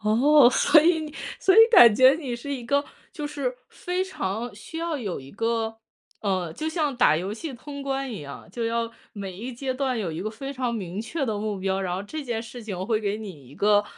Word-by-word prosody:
哦， 245 +6 +6
所 305 +4 +5
以 325 +1 +3
你 310 -1 -7 0.3
所 380 - +4
以 - - +6
感 235 - +9
觉 260 +3 +7
你 265 -7 -4
是 285 +4 -6
一 245 -3 -7
个， 280 +3 +1 0.3
就 300 -3 -4
是 280 -4 -3
非 360 +1 -3
常 225 - -4
需 320 +10 -8
要 335 -2 -2
有 210 -10 -4
一 135 +1 -12
个 225 +2 -2 0.4
呃， 185 -5 -1
就 310 - -3
像 310 -4 -1
打 155 -10 +5
游 185 +5 -3
戏 285 +7 -6
通 280 +3 -8
关 270 -1 -2
一 210 - -6
样， 140 -1 -10
就 235 - -3
要 230 0 -1 0.2
每 200 -2 -6
一 240 +6 -6
阶 260 +2 -3
段 255 -2 -1
有 185 -7 -2
一 160 - -5
个 215 +3 -3
非 270 +5 -6
常 255 -3 -2
明 195 -3 -4
确 275 +7 -3
的 220 -5 -2
目 210 -1 -3
标， 190 0 -1
然 180 -2 -2
后 190 - -3
这 305 +10 -6
件 240 -4 -3
事 240 +1 -9
情 190 -4 -5
会 220 -1 +1
给 205 -1 -1
你 185 - -9
一 140 - -14
个 205 +2 +3
235 Hz, 250 characters per minute, -25 LUFS, 205-280 Hz, 0.4 s, 感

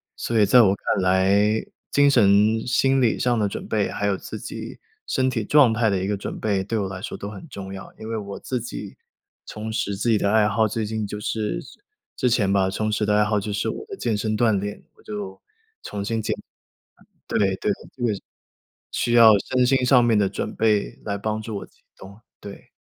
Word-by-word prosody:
所 115 -2 -1
以 105 - +6
在 120 +4 +7
我 95 -3 +4
看 100 -1 -1
来， 100 +4 +2 0.2
精 145 0 +4
神 105 -1 +4
心 135 +1 +2
理 115 - +2
上 120 -2 +1
的 105 - +2
准 - - -6
备， 105 -2 0
还 100 - -3
有 100 -1 +2
自 - - -8
己 - - -7 0.3
身 130 0 +1
体 115 -4 -2
状 135 -1 +5
态 115 -1 +2
的 100 - +1
一 - - -1
个 105 +1 0
准 100 - -6
备， 100 -3 0
对 110 +3 -2
我 100 -2 -1
来 95 -1 -7
说 - - -5
都 100 - -6
很 105 +10 -10
重 95 -5 -8
要。 95 - -9
因 110 - -9
为 115 - -2
我 100 -1 -6
自 125 -2 -3
己 105 -4 -7 0.5
重 110 +1 -6
拾 100 -3 -1
自 110 +4 -1
己 110 - +4
的 100 - +1
爱 110 -1 +4
好， 110 +2 +2
最 110 +1 -2
近 110 -1 -3
就 105 - -6
是 105 0 -2
之 - - -15 0.5
之 - - +4
前 105 -5 +2
吧， 95 -1 +2
重 110 +2 -2
拾 105 0 0
的 105 - +3
爱 105 - +4
好 105 0 +1
就 105 +1 -4
是 100 - -1
我 - - -5
的 400 - -7
健 110 - -1
身 110 +1 -1
锻 110 -4 +3
炼， 105 +1 -6
我 - - -22
就 100 -2 -7 0.4
重 100 -1 -5
新 115 0 -1
捡 110 - -1 0.9
对 - - -1
对， 95 -2 +1 0.2
这 - - -9
个， 110 - +2 0.8
需 120 - -1
要 115 -2 +8
身 125 +4 +1
心 130 0 +2
上 125 -1 +5
面 115 -2 +3
的 100 -2 +3
准 95 - -4
备 105 -2 +1
来 100 -1 -2
帮 110 +1 -3
助 110 -2 -5
我 - - -7
启 - - -31 0.2
动， 100 +3 -13 0.2
对。 100 -1 -11
105 Hz, 245 characters per minute, -23 LUFS, 100-115 Hz, 0.9 s, 要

